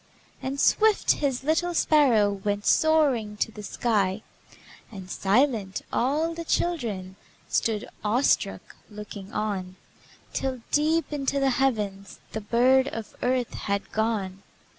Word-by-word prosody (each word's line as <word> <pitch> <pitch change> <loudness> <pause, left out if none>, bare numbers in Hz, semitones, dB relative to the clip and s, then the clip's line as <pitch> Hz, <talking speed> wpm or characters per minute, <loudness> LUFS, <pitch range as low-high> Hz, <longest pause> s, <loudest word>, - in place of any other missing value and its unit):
And 270 +1 -4
swift, 435 +5 +4
His 270 -3 -1
little 335 +4 0
sparrow 250 -12 +4
Went 205 +1 -3
soaring 275 -10 +3
to 225 - -1
the 210 - -9
sky, 210 -2 0 0.7
And 190 -3 -9
silent, 210 -2 +1
all 305 +7 +1
the 335 0 -6
children 220 - -2 0.3
Stood, 220 -2 0 0.2
awestruck, 230 +6 0
looking 210 -1 -9
on, 195 -4 -3 0.6
Till, 260 -2 -2
deep 310 +1 +1
into 280 -1 -1
the 270 -1 +2
heavens, 210 -7 -1
The 220 - -4
bird 255 +5 +3
of 225 -5 -6
earth 250 -1 0
had 200 0 -3
gone. 210 -4 -1
230 Hz, 120 wpm, -26 LUFS, 205-280 Hz, 0.7 s, swift